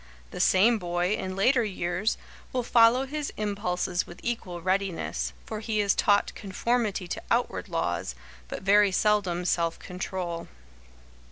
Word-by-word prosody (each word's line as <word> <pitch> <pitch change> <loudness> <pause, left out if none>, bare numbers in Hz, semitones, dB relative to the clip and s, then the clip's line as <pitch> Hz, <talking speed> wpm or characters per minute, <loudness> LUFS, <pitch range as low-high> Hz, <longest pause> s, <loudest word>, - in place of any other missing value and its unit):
The - - -7
same 220 +5 +4
boy, 175 +1 0
in 185 -2 -3
later 240 +5 +3
years, 185 0 -1 0.3
will 250 -1 -1
follow 235 +3 +5
his 295 +1 -4
impulses 185 -3 -1
with 175 - -11
equal 190 -7 -3
readiness, 185 - -1
for 215 - -5
he 215 0 -1
is 200 -1 +3
taught 205 -1 +2
conformity 210 -1 -1
to - - -4
outward - - 0
laws, - - -2 0.3
but - - -6
very 200 +1 +5
seldom 190 -3 +1
self 170 -2 +1
control. 180 -2 -5
195 Hz, 140 wpm, -27 LUFS, 180-215 Hz, 0.3 s, follow